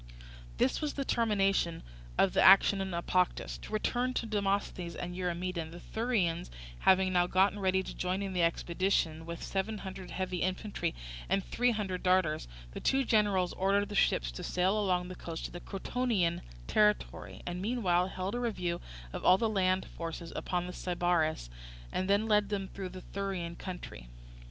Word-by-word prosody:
This 130 - +2
was 300 -1 -1
the 275 - -2
termination 195 -8 +1 0.3
of - - +4
the - - +3
action 195 +1 +7
at 195 - -2
Naupactus. 180 0 0
To - - -10
return 245 +4 0
to - - 0
Demosthenes 200 -4 -1
and 175 0 -5
Eurymedon: 180 -2 -2
the 170 +2 -10
Thurians 205 - -1 0.3
having 190 - +4
now 175 -1 +4
got 190 +2 +3
ready 190 -2 +1
to - - -7
join 185 +2 -1
in 195 -1 -3
the 180 - +1
expedition 170 -1 0
with 170 0 -6
seven 200 +3 -2
hundred 190 -2 -7
heavy 185 -1 -2
infantry 185 - -2 0.3
and 195 +1 +1
three 245 +1 +1
hundred 200 -5 -2
darters, 180 - +2 0.2
the - - -6
two 270 0 +2
generals 205 -6 +2
ordered 200 +2 +1
the - - -6
ships - - +2
to - - -7
sail 185 +4 +1
along 180 -3 +1
the 185 - -6
coast 165 -2 -6
to - - -5
the 175 - -7
Crotonian 195 -3 -1 0.2
territory, 210 - +1
and 180 +1 -4
meanwhile 190 -5 +1
held 190 +1 -4
a 245 - -1
review 180 -8 -2 0.3
of - - -5
all 185 - +7
the 225 - +1
land 185 -3 +1
forces 165 0 -6
upon 180 -1 -1
the 180 - -6
river 180 - -7
Sybaris, 175 - 0 0.4
and 185 +1 -1
then 200 +2 +3
led 210 -2 +3
them 195 -2 -2
through 190 -2 -6
the 185 0 -9
Thurian 190 -4 -4
country. 175 - -8
185 Hz, 175 wpm, -31 LUFS, 175-200 Hz, 0.4 s, action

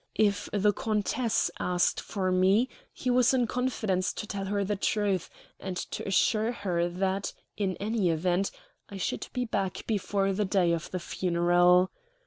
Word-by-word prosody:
If 205 -2 +2
the 205 0 +3
countess 220 +3 0
asked 180 -1 +1
for 185 -3 -2
me, 190 +7 +3 0.2
he 250 - -2
was 250 +1 +4
in 250 -2 +3
confidence 220 -7 -1
to - - -5
tell 200 -2 -4
her 200 +1 0
the 205 +2 -1
truth, 200 -2 0 0.3
and 185 -2 -5
to - - -5
assure 215 +3 +2
her 175 -6 -1
that, 190 +2 -1 0.2
in 195 -3 -1
any 210 -3 0
event, 175 +4 +1 0.4
I 200 - -7
should 190 - -3
be 250 0 -1
back 195 -5 -2
before 200 -2 0
the 210 +2 0
day 185 -3 +2
of 165 -2 -3
the 185 - -3
funeral. 175 +1 +3
195 Hz, 160 wpm, -28 LUFS, 185-215 Hz, 0.4 s, was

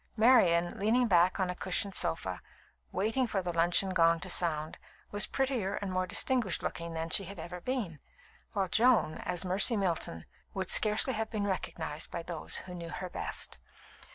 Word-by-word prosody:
Marian, 180 -8 +4
leaning 230 +5 +3
back 180 -1 +3
on 185 -1 0
a - - -7
cushioned 190 +2 -2
sofa, 95 - -1 0.5
waiting 225 +5 0
for 195 -4 -2
the 175 -1 -3
luncheon 175 +3 +2
gong 165 -2 +3
to 185 - -1
sound, 155 -3 +1 0.3
was 205 -1 +2
prettier 255 -8 -1
and 200 -2 -4
more 185 0 -1
distinguished 235 -1 +2
looking 170 -1 -4
than 160 0 -4
she 195 - +4
had 200 +2 -9
ever 175 +2 -7
been; 210 - -3 0.5
while 195 -3 0
Joan, 220 -6 +3
as 180 +1 -2
Mercy 195 +5 +4
Milton, 170 - -2 0.3
would 190 -1 -3
scarcely 215 +5 +3
have 220 0 -2
been 210 -3 -2
recognised 160 -5 -4
by 170 - -5
those 165 -2 -4
who 180 - -9
knew 170 -1 -7
her 185 +1 -6
best. - - -4
185 Hz, 175 wpm, -31 LUFS, 170-210 Hz, 0.5 s, Marian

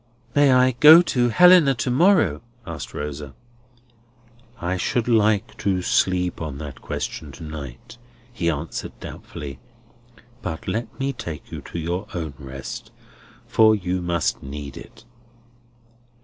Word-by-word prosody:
"I 145 0 +5
may 130 0 +5
go 160 +4 +10
to 120 -7 +1
Helena 175 0 +6
to 125 +2 -2
morrow?" 145 - +3 0.2
asked 85 -3 -7
Rosa. 75 -1 -6 1.2
"I 90 +2 -1
should 110 +6 -1
like 110 -2 +2
to 95 -2 0
sleep 90 -1 +1
on 75 -4 -5
that 70 -3 -8
question 75 - -5
to 75 - -11
night," 75 - -9 0.3
he 85 -8 0
answered 80 +1 -5
doubtfully. 70 -4 -8 0.8
"But 80 - -5
let 110 +6 -4
me 135 +1 -1
take 80 - -8
you - - -6
to - - -8
your 85 +5 -3
own 80 -4 -4
rest, 65 -1 -8 0.6
for 110 -1 +5
you 90 -2 -2
must 85 -2 -1
need 70 0 -7
it." - - -13
90 Hz, 135 wpm, -23 LUFS, 75-120 Hz, 1.2 s, go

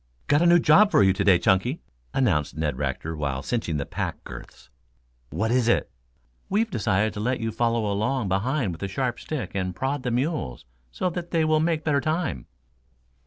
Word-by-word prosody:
"Got 145 +2 +3
a 175 - +4
new 175 0 +7
job 175 +6 +5
for 105 - +4
you 95 -1 +4
to - - -1
day, 95 -3 +6
Chunky," 95 - +1 0.3
announced 85 - 0
Ned 80 -3 -1
Rector 80 +5 -3
while 70 -3 -3
cinching 110 -10 -2
the 70 - -3
pack - - -4
girths. - - -11 0.6
"What 110 - -1
is 125 -1 +2
it?" 120 - +1 0.6
"We've 220 +2 +1
decided 105 - +1
to - - -6
let 125 +4 -1
you 115 -1 -2
follow 115 0 0
along 105 +4 0
behind 105 +4 0
with 80 - -9
a 100 - -2
sharp 125 +4 -2
stick 125 - -5
and 95 -2 -2
prod 135 +4 -2
the 125 - -2
mules 120 - -2 0.2
so 180 - -2
they 170 -2 -1
will 155 0 +3
make 160 -1 0
better 145 -2 +1
time." 155 - -2
120 Hz, 190 wpm, -25 LUFS, 95-155 Hz, 0.6 s, new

